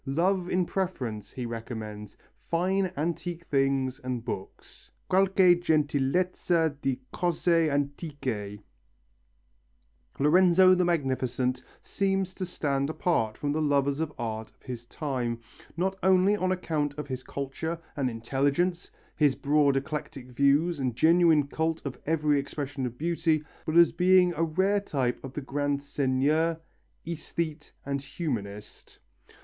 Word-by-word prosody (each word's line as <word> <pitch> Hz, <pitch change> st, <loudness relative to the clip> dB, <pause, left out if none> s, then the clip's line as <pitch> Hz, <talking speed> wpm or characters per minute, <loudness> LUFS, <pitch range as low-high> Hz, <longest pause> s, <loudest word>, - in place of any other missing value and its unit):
"Love 180 Hz, +6 st, +1 dB
in 180 Hz, 0 st, +1 dB
preference," 130 Hz, -, -3 dB
he 125 Hz, -, -4 dB
recommends, 110 Hz, -3 st, -6 dB, 0.3 s
"fine 185 Hz, +2 st, +1 dB
antique 170 Hz, +2 st, -3 dB
things 135 Hz, -2 st, +1 dB
and 125 Hz, -3 st, -4 dB
books" 95 Hz, -5 st, -8 dB, 0.2 s
qualche 190 Hz, -1 st, +5 dB
gentilezza 160 Hz, +1 st, +1 dB
di 130 Hz, -2 st, -1 dB
cose 170 Hz, -2 st, +2 dB
antiche. 140 Hz, -, -3 dB, 1.6 s
Lorenzo 185 Hz, +4 st, +6 dB
the 180 Hz, 0 st, +3 dB
Magnificent 130 Hz, -6 st, 0 dB, 0.2 s
seems 195 Hz, -1 st, -1 dB
to 185 Hz, -, -4 dB
stand 140 Hz, -5 st, -1 dB
apart 135 Hz, -10 st, 0 dB
from 145 Hz, -, -2 dB
the 155 Hz, +2 st, 0 dB
lovers 140 Hz, -1 st, +1 dB
of 160 Hz, -2 st, -1 dB
art 110 Hz, -2 st, -4 dB
of -, -, -33 dB
his 120 Hz, -2 st, -7 dB
time 125 Hz, -5 st, -3 dB, 0.4 s
not 190 Hz, +2 st, 0 dB
only 190 Hz, +2 st, +4 dB
on 185 Hz, -2 st, 0 dB
account 155 Hz, -5 st, -1 dB
of 150 Hz, -, -5 dB
his 130 Hz, -2 st, -4 dB
culture 140 Hz, +6 st, -4 dB, 0.2 s
and 135 Hz, -3 st, 0 dB
intelligence, 140 Hz, +10 st, 0 dB, 0.3 s
his 145 Hz, -3 st, +3 dB
broad 145 Hz, -1 st, +3 dB
eclectic 135 Hz, -2 st, -5 dB
views 140 Hz, +6 st, +2 dB
and 130 Hz, -3 st, -1 dB
genuine 160 Hz, +1 st, +5 dB
cult 160 Hz, +3 st, -1 dB
of 135 Hz, -, -5 dB
every 150 Hz, -2 st, +2 dB
expression 140 Hz, -1 st, -4 dB
of 120 Hz, 0 st, -9 dB
beauty, 165 Hz, -1 st, +1 dB, 0.2 s
but 160 Hz, +1 st, +1 dB
as 170 Hz, -1 st, +7 dB
being 180 Hz, -1 st, +4 dB
a 165 Hz, -, -3 dB
rare 190 Hz, +5 st, +2 dB
type 135 Hz, -11 st, -2 dB
of 135 Hz, -1 st, -7 dB
the 150 Hz, -, -4 dB
grand 145 Hz, +1 st, -1 dB
seigneur, 145 Hz, +4 st, +1 dB, 0.5 s
æsthete 165 Hz, -1 st, -4 dB
and 140 Hz, 0 st, -2 dB
humanist. 105 Hz, -, -6 dB
150 Hz, 130 wpm, -28 LUFS, 130-170 Hz, 1.6 s, as